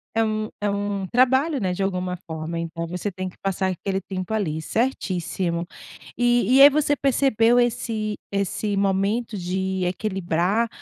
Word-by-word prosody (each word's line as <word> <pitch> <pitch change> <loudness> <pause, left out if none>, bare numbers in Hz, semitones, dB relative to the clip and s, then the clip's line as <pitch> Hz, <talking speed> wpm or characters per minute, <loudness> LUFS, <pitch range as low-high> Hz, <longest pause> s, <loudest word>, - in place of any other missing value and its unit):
é 225 - +3
um 215 0 -2
é 205 - -1
um 200 -1 -2
trabalho, 260 - +3
né, 185 -2 0
de 185 +2 -2
alguma 180 -1 -2
forma, 160 0 -5
então 165 0 -4
você 180 +4 -3
tem 185 0 -4
que - - -19
passar 190 -1 -1
aquele 190 +2 -3
tempo 185 +2 -5
ali, 165 -8 -1
certíssimo. 180 -5 -1 0.5
E 240 -1 +3
e - - +8
aí 285 - +11
você 290 0 +2
percebeu 245 -3 +3
esse 220 -3 -1 0.2
esse 200 +1 -1
momento 200 +3 0
de 190 +1 -2
equilibrar 190 +2 0
195 Hz, 155 wpm, -23 LUFS, 180-225 Hz, 0.5 s, aí